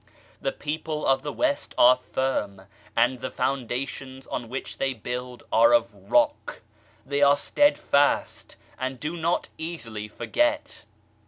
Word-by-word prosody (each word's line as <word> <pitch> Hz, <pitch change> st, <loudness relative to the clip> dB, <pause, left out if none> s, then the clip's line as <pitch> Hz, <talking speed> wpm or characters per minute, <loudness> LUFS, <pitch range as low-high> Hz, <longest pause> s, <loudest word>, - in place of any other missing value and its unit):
The -, -, 0 dB
people 155 Hz, +1 st, -4 dB
of 135 Hz, 0 st, +3 dB
the 145 Hz, -, -4 dB
West 295 Hz, -2 st, -1 dB
are 125 Hz, +1 st, +8 dB
firm, 105 Hz, -7 st, -2 dB, 0.3 s
and 120 Hz, +2 st, +3 dB
the 130 Hz, -, -4 dB
foundations 130 Hz, +1 st, -3 dB
on 115 Hz, -, -5 dB
which 130 Hz, +2 st, -6 dB
they 135 Hz, -1 st, 0 dB
build 125 Hz, +2 st, -6 dB
are 290 Hz, +1 st, +6 dB
of 295 Hz, -, +1 dB
rock; 295 Hz, -, 0 dB, 0.4 s
they 140 Hz, +1 st, -1 dB
are 140 Hz, 0 st, +6 dB
steadfast, 145 Hz, -, +2 dB, 0.2 s
and 130 Hz, 0 st, -3 dB
do 155 Hz, +3 st, -3 dB
not 170 Hz, +1 st, -1 dB
easily 115 Hz, -11 st, -5 dB
forget. 300 Hz, -, -1 dB
135 Hz, 135 wpm, -26 LUFS, 125-160 Hz, 0.4 s, are